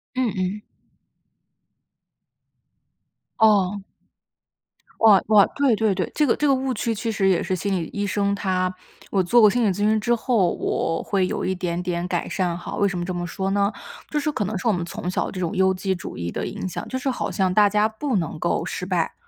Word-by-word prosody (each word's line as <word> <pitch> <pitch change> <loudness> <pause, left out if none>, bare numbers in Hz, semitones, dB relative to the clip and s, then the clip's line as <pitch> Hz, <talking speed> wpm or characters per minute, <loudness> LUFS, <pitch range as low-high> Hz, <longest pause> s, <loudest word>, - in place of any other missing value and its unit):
嗯 255 -3 +1
嗯。 190 +2 -2 2.8
哦。 205 -3 +3 1.2
哇， 210 -4 +6
哇， 210 -2 +6
对 275 -5 +3
对 215 -1 +1
对。 - - -2
这 300 - +3
个 245 - +2
这 295 - 0
个 275 - +5
误 260 0 -1
区 230 +1 -1
其 225 +2 -2
实 200 -2 +1
也 180 -3 +2
是 185 - -1
心 195 +2 -2
理 170 -3 -2
医 205 0 -2
生， 200 0 0
他 185 -2 -1 0.4
我 195 - +2
做 235 +7 +4
过 215 - +8
心 245 +3 +1
理 - - +3
咨 185 - -2
询 215 +1 +2
之 240 +2 +1
后， 220 -7 +1
我 165 - -1
会 190 -2 0
有 - - -3
一 190 - 0
点 180 -1 -3
点 175 -1 -2
改 175 -1 -2
善 175 -3 -1
哈。 175 - -6
为 200 - +2
什 195 - -3
么 175 - -2
这 185 - -3
么 175 0 -3
说 190 +3 -3
呢？ 200 +1 +2 0.4
就 300 - 0
是 300 +1 -1
可 210 - -2
能 210 +1 -3
是 185 - -3
我 220 - +4
们 175 -1 -2
从 175 +1 -5
小 185 - -1
这 185 - -6
种 180 +3 -2
优 190 0 +3
绩 190 +1 -1
主 175 - -7
义 85 0 -4
的 - - -3
影 - - -5
响， 180 - -6
就 260 - -3
是 270 +1 -2
好 255 - -2
像 190 -2 0
大 210 +1 +5
家 210 +1 +2
不 245 +4 -3
能 165 -4 -2
够 170 - 0
失 180 - -4
败， 180 -3 -1
195 Hz, 240 characters per minute, -23 LUFS, 180-220 Hz, 2.8 s, 过